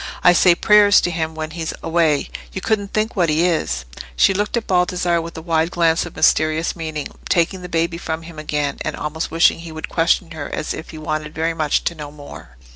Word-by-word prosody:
I 180 - +7
say 175 0 +5
prayers 205 +1 +6
to 175 - -1
him 160 -1 -3
when 155 0 -5
he's 160 -1 -4
away. 165 -3 +1 0.2
You - - -3
couldn't 205 0 -1
think 215 +1 -1
what 175 -5 +2
he 155 +3 +2
is!" 65 - -1 0.3
She 195 - +4
looked 205 +4 -1
at 230 - -2
Baldassarre 180 -2 +1
with 165 0 -8
a 160 - -7
wide 165 -1 +1
glance 170 -1 +1
of 175 - -12
mysterious 155 +2 +2
meaning, 155 -3 -5 0.2
taking 180 +2 +1
the 180 - -8
baby 170 0 -1
from 160 -1 -4
him 165 -1 -10
again, 150 -2 -2
and 155 - -3
almost 150 +2 -4
wishing 165 +1 +3
he 165 -1 -9
would 160 0 -6
question 165 +1 +1
her 155 -3 -6
as - - -3
if 155 - -8
he 160 - -9
wanted 155 0 -4
very 165 +1 0
much 155 -2 0
to - - -1
know 150 -3 -8
more. 145 - -12
165 Hz, 220 wpm, -20 LUFS, 155-175 Hz, 0.3 s, I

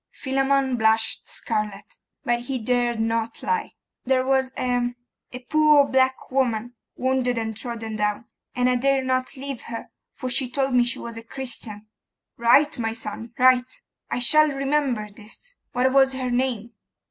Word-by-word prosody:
Philammon 270 -1 +1
blushed 220 0 +1
scarlet, 210 -2 -4 0.3
but 240 0 +1
he 255 +2 -3
dared 240 0 0
not 225 0 -1
lie. 460 -1 -1 0.3
'There 255 0 +1
was 265 -1 +2
a 245 -1 0 0.4
a 250 - -7
poor 300 +1 +5
black 260 0 +1
woman, 245 -3 0 0.2
wounded 255 -1 0
and 220 -1 -2
trodden 225 -1 -5
down, 210 +2 -1 0.3
and 250 0 +2
I 250 0 +3
dare 270 +1 +2
not 255 +1 -1
leave 275 -2 -5
her, 230 -1 -7 0.2
for 255 - -5
she 250 0 -1
told 270 +1 0
me 245 -1 +4
she 240 - -2
was 235 -1 -7
a 230 - -8
Christian.' 230 -4 -6 0.5
'Right, 250 +5 +4
my 225 -1 -1
son, 225 +1 -7
right. 255 - +3 0.3
I - - -1
shall 305 +5 +5
remember 275 -5 0
this. 220 - -14 0.2
What 255 +1 +2
was 270 -1 +5
her 255 -1 -3
name? 240 -3 -1
250 Hz, 160 wpm, -24 LUFS, 230-265 Hz, 0.5 s, poor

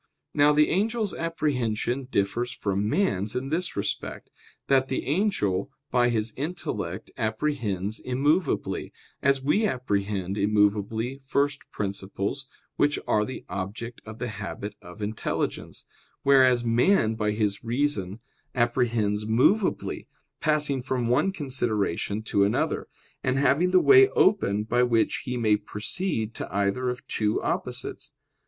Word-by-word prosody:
Now 145 0 +5
the 150 0 +4
angel's 215 +2 0
apprehension 135 -6 -1
differs 120 +1 -1
from 100 -4 -1
man's 110 - 0
in 135 +2 -2
this 175 +4 -1
respect, 100 - -4 0.3
that 135 -1 +3
the 130 - -2
angel 135 - 0 0.2
by 120 -1 +3
his 110 -1 0
intellect 115 - -4
apprehends 110 -4 -1
immovably, 145 +6 0 0.3
as 135 -1 +2
we 205 +10 +3
apprehend 100 - -2
immovably 105 +4 +1
first 140 0 0
principles 100 +6 -3 0.3
which 145 0 +2
are 105 - +3
the 130 - -6
object 100 +5 -5
of 110 0 -9
the 125 - -3
habit 105 -1 -6
of 90 +4 -9
"intelligence"; 110 +1 -3 0.4
whereas 130 -3 +5
man 115 - +3
by 105 -1 -1
his 105 -2 -1
reason 115 -5 -1 0.4
apprehends 115 -4 +1
movably, 130 - +1 0.3
passing 150 -3 +1
from 125 -2 -1
one 150 +10 +3
consideration 110 - -1
to 100 -2 +2
another; 100 - 0 0.4
and 130 0 +1
having 140 +6 +3
the 185 0 +5
way 395 - +7
open 105 - +2
by 120 +3 +1
which 120 -2 +2
he 125 -1 -2
may 110 -3 +3
proceed 110 - -3
to - - -6
either 100 +6 0
of 125 0 -5
two 105 -1 0
opposites. - - -3
120 Hz, 130 wpm, -26 LUFS, 105-140 Hz, 0.4 s, way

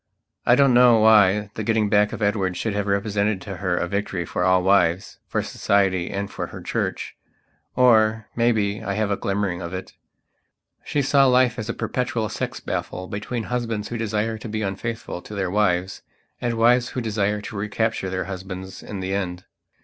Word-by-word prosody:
I 120 - +7
don't 135 -1 +4
know 120 -1 +7
why 105 -2 +5
the 110 - -5
getting 110 0 +1
back 105 0 +3
of - - -4
Edward 100 -3 0
should 110 - -2
have 105 0 -2
represented 100 0 0
to 95 0 -7
her 90 -1 -1
a 90 - -1
victory 95 -2 -2
for 90 - -2
all 95 0 +3
wives, 95 -2 +2
for - - -1
Society 95 -3 +1
and 100 +1 -3
for - - -4
her - - -9
Church. - - -3 0.6
Or, 110 -3 +4
maybe, 110 -3 +1
I 100 - -2
have 105 -1 0
a - - +2
glimmering 95 -3 -2
of 85 +1 -5
it. 95 +1 -7 0.9
She 145 - -1
saw 135 0 +4
life 125 -2 +3
as 110 0 -5
a - - 0
perpetual 120 -4 -2
sex - - -4
battle 90 - -4
between 110 +4 -4
husbands 115 -3 -3
who 120 - -3
desire 110 0 -1
to 110 - -7
be 110 0 -2
unfaithful 105 0 -4
to 105 - -9
their 95 -2 -1
wives, 95 -2 0 0.4
and 120 -1 -1
wives 120 +2 +3
who 130 - -4
desire 105 -2 0
to 105 - -8
recapture 105 0 -1
their 95 0 -2
husbands 95 0 -7
in 100 -3 -6
the 95 +1 -2
end. 90 -2 -3
105 Hz, 190 wpm, -23 LUFS, 95-115 Hz, 0.9 s, I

